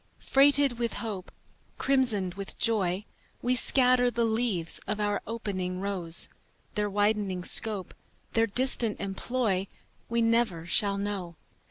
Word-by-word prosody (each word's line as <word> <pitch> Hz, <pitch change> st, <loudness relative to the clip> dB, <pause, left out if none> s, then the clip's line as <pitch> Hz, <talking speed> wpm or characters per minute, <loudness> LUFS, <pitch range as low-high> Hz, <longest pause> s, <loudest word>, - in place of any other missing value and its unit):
Freighted 280 Hz, -2 st, +3 dB
with 235 Hz, -1 st, -1 dB
hope, 205 Hz, -5 st, -6 dB, 0.5 s
Crimsoned 235 Hz, -9 st, +1 dB
with 195 Hz, +1 st, -8 dB
joy, 205 Hz, -4 st, 0 dB, 0.4 s
We 245 Hz, -, +2 dB
scatter 250 Hz, 0 st, +3 dB
the 235 Hz, 0 st, -1 dB
leaves 220 Hz, -7 st, 0 dB
of 210 Hz, +1 st, -2 dB
our 205 Hz, -1 st, -1 dB
opening 185 Hz, -5 st, -4 dB
rose; 185 Hz, -4 st, +4 dB, 0.5 s
Their 210 Hz, 0 st, -1 dB
widening 205 Hz, -2 st, -1 dB
scope, 205 Hz, -1 st, +1 dB, 0.4 s
Their 225 Hz, 0 st, +2 dB
distant 235 Hz, -1 st, +2 dB
employ, 200 Hz, 0 st, -2 dB, 0.4 s
We 235 Hz, 0 st, 0 dB
never 225 Hz, -8 st, 0 dB
shall 200 Hz, +2 st, +1 dB
know. 200 Hz, -4 st, -4 dB
210 Hz, 125 wpm, -27 LUFS, 190-235 Hz, 0.5 s, rose